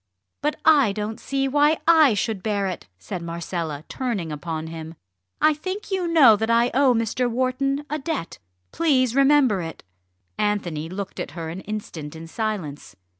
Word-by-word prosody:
"But 300 Hz, +1 st, 0 dB
I 285 Hz, -10 st, +5 dB
don't 215 Hz, +2 st, -4 dB
see 270 Hz, +1 st, -1 dB
why 295 Hz, +3 st, +3 dB
I 315 Hz, -8 st, +6 dB
should 205 Hz, -1 st, -1 dB
bear 205 Hz, -2 st, -1 dB
it," 185 Hz, -, -5 dB
said 95 Hz, -, -6 dB
Marcella, 165 Hz, -3 st, -4 dB
turning 215 Hz, -11 st, -3 dB
upon 160 Hz, +1 st, -4 dB
him. 160 Hz, 0 st, -8 dB, 0.4 s
"I 310 Hz, 0 st, +5 dB
think 375 Hz, +7 st, -6 dB
you 375 Hz, -2 st, 0 dB
know 300 Hz, -10 st, +7 dB
that 220 Hz, +2 st, -2 dB
I 235 Hz, +1 st, +3 dB
owe 260 Hz, -1 st, +4 dB
Mr. 230 Hz, +2 st, 0 dB
Wharton 260 Hz, +4 st, -1 dB
a 300 Hz, +2 st, -3 dB
debt. 285 Hz, -, -4 dB, 0.3 s
Please 260 Hz, -7 st, +2 dB
remember 275 Hz, -7 st, +4 dB
it!" 165 Hz, -1 st, -7 dB, 0.6 s
Anthony 175 Hz, -7 st, -1 dB
looked 195 Hz, +2 st, -6 dB
at 160 Hz, -, -6 dB
her 165 Hz, -1 st, -4 dB
an 175 Hz, +4 st, -6 dB
instant 175 Hz, -8 st, -6 dB
in 160 Hz, +1 st, -8 dB
silence. 165 Hz, -, -4 dB
220 Hz, 165 wpm, -23 LUFS, 170-275 Hz, 0.6 s, know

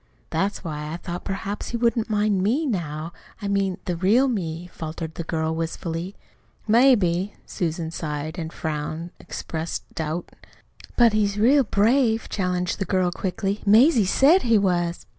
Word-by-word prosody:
"That's 200 Hz, +1 st, -1 dB
why 150 Hz, -2 st, -5 dB
I 165 Hz, -, -4 dB
thought 175 Hz, 0 st, -6 dB
perhaps 195 Hz, +1 st, -4 dB
he 235 Hz, -, -2 dB
wouldn't 230 Hz, -1 st, +1 dB
mind 210 Hz, -2 st, +1 dB
ME 245 Hz, +11 st, +1 dB
now 165 Hz, -, -3 dB, 0.3 s
I 205 Hz, -, -4 dB
mean 195 Hz, -2 st, 0 dB
the 180 Hz, -3 st, -1 dB
real 210 Hz, +10 st, +3 dB
me," 175 Hz, -8 st, -3 dB
faltered 160 Hz, 0 st, -6 dB
the 170 Hz, -, -5 dB
girl 160 Hz, 0 st, -1 dB
wistfully. 165 Hz, +2 st, -4 dB, 0.5 s
"Maybe." 205 Hz, -6 st, +4 dB
Susan's 165 Hz, -1 st, -3 dB
sigh 150 Hz, -1 st, -3 dB
and 160 Hz, -1 st, -5 dB
frown 155 Hz, +2 st, -4 dB
expressed 160 Hz, 0 st, -5 dB
doubt. 160 Hz, +2 st, -4 dB, 0.7 s
"But 235 Hz, -3 st, +6 dB
he's 205 Hz, -1 st, +1 dB
real 265 Hz, +6 st, +5 dB
brave," 225 Hz, +2 st, +2 dB
challenged 180 Hz, -2 st, -1 dB
the 195 Hz, -, -1 dB
girl 185 Hz, -2 st, +1 dB
quickly. 195 Hz, +3 st, -2 dB
"Mazie 225 Hz, -, +5 dB
SAID 290 Hz, -, +5 dB
he 230 Hz, -2 st, +3 dB
was." 175 Hz, -3 st, 0 dB
185 Hz, 150 wpm, -24 LUFS, 165-215 Hz, 0.7 s, But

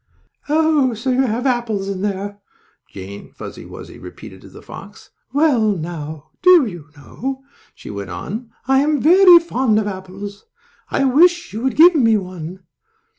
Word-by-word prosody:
"Oh, 300 Hz, -5 st, +2 dB
so 235 Hz, +4 st, -2 dB
you 255 Hz, +1 st, +2 dB
have 235 Hz, +4 st, -3 dB
apples 235 Hz, -6 st, -1 dB
in 195 Hz, -1 st, -4 dB
there?" 200 Hz, 0 st, -4 dB, 0.5 s
Jane 100 Hz, +1 st, -10 dB
Fuzzy -, -, -10 dB
Wuzzy -, -, -11 dB
repeated -, -, -12 dB
to -, -, -14 dB
the -, -, -15 dB
fox. 205 Hz, +2 st, -13 dB, 0.2 s
"Well, 260 Hz, -7 st, +2 dB
now, 155 Hz, -2 st, -7 dB
do 360 Hz, -5 st, +6 dB
you 170 Hz, -7 st, -10 dB
know," 265 Hz, -, -7 dB, 0.3 s
she -, -, -10 dB
went 100 Hz, -1 st, -7 dB
on, 210 Hz, -, -6 dB, 0.2 s
"I 270 Hz, 0 st, +3 dB
am 295 Hz, +1 st, +1 dB
very 355 Hz, +4 st, +7 dB
fond 260 Hz, -9 st, 0 dB
of 215 Hz, -, 0 dB
apples. 200 Hz, -, -8 dB, 0.4 s
I -, -, 0 dB
wish 345 Hz, +7 st, +3 dB
you 220 Hz, -, -5 dB
would 265 Hz, +1 st, -1 dB
give 345 Hz, +3 st, +7 dB
me 225 Hz, -8 st, +3 dB
one." 185 Hz, -1 st, -8 dB
225 Hz, 160 wpm, -19 LUFS, 190-275 Hz, 0.5 s, very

